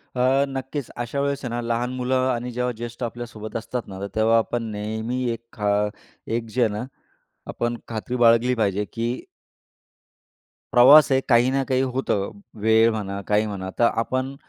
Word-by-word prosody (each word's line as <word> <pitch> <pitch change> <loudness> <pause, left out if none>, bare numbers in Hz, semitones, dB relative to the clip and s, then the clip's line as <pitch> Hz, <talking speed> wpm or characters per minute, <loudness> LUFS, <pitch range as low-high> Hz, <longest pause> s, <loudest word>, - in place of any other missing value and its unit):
अ, 125 - 0 0.3
नक्कीच.अशा 135 -1 -4
वेळेस 140 0 -1
आहे - - -2
ना 120 - -2
लहान 120 +1 -1
मुलं, 130 0 +1
आणि 120 +1 -4
जेव्हा 125 +1 -1
ज्येष्ठ 120 +1 -6
आपल्यासोबत 115 -2 -6
असतात 115 +2 -5
ना 95 -1 -8
तर 100 - -3
तेव्हा 110 +1 +4
आपण 115 +2 0
नेहमी 110 +4 -3
एक 115 0 -6
खा 105 -1 -1 0.7
एक 115 - -4
जे 130 - +2
आहे 110 - +2
ना 105 +3 -3 0.7
आपण 120 0 -2
खात्री 115 +2 -4
बाळगली 120 +1 +4
पाहिजे 105 -2 0
की 115 +1 -1 1.6
प्रवास 140 +5 +8
आहे, 135 0 +4
काही 120 0 +5
ना 135 0 +1
काही 130 0 +2
होतं. 125 -6 -1 0.3
वेळ 110 +1 +5
म्हणा, 100 -3 -4
काही 105 +1 +2
म्हणा, 95 -2 -5
तर - - +4 0.2
आपण 130 +3 -2
120 Hz, 165 wpm, -23 LUFS, 110-125 Hz, 1.6 s, प्रवास